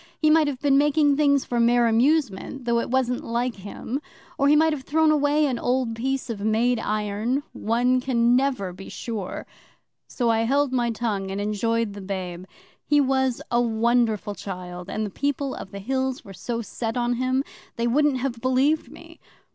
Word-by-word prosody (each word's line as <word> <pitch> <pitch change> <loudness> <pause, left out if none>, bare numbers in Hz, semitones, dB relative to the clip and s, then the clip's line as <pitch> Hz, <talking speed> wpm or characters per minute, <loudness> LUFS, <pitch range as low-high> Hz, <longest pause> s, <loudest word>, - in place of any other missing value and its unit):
He 310 -1 +3
might 315 -1 +5
have 275 -3 -3
been 275 -1 +3
making 290 0 +3
things 280 -2 +3
for 240 - -1
mere 240 +1 +4
amusement, 250 0 +1
though 235 0 +2
it - - -3
wasn't 250 -1 0
like 235 0 -2
him, 210 +7 -5 0.3
or 280 - +2
he 295 - +6
might 320 +1 +4
have 290 - -4
thrown 310 +3 +2
away 295 0 +3
an 255 -4 -1
old 250 -2 0
piece 265 +3 -2
of 230 -4 -4
made 225 +3 +2
iron. 215 +6 -1
One 245 +3 +1
can 240 -2 +2
never 250 -9 0
be 190 +2 -10
sure. 215 -6 -5 0.6
So 240 -3 0
I 225 - +2
held 270 +4 +1
my 240 -2 +1
tongue 210 -4 -2
and 195 +1 -3
enjoyed 215 +1 -1
the 200 - -8
babe. 185 -2 -5 0.4
He 295 0 +3
was 265 -2 +1
a 240 0 +3
wonderful 230 -2 +1
child 180 -2 -7
and 215 +1 -2
the 205 - -6
People 280 +3 -2
of - - -8
the 200 - -8
Hills 260 +5 -2
were 195 - -10
so 230 +4 -4
set 225 +2 -4
on 240 0 +1
him, 255 +2 +1 0.3
they 235 - -1
wouldn't 280 +3 +2
have 250 -2 -3
believed 265 +5 +1
me. - - -14
240 Hz, 185 wpm, -24 LUFS, 220-270 Hz, 0.6 s, he